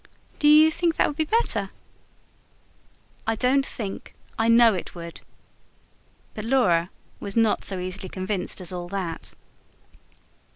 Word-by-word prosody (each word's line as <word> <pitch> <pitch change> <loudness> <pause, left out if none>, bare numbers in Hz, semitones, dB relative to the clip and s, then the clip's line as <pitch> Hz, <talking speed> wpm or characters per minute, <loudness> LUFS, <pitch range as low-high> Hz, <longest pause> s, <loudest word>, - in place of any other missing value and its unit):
"Do 295 - +3
you 305 +1 +7
think 335 0 0
that - - +3
would 295 - -3
be 315 +1 0
better?" 260 - +1 1.6
"I 225 - +1
don't 260 +4 +2
think 205 -7 -6 0.2
I 225 - 0
know 230 -1 +6
it 185 - -6
would." 170 -1 -9 1.1
But 215 - -6
Laura 185 -9 +2 0.3
was 200 +2 -4
not 225 -2 +2
so 195 - -1
easily 185 +1 -5
convinced 185 +1 -2
as 180 - +2
all 175 -1 -5
that. 175 -3 -5
210 Hz, 135 wpm, -24 LUFS, 185-265 Hz, 1.6 s, you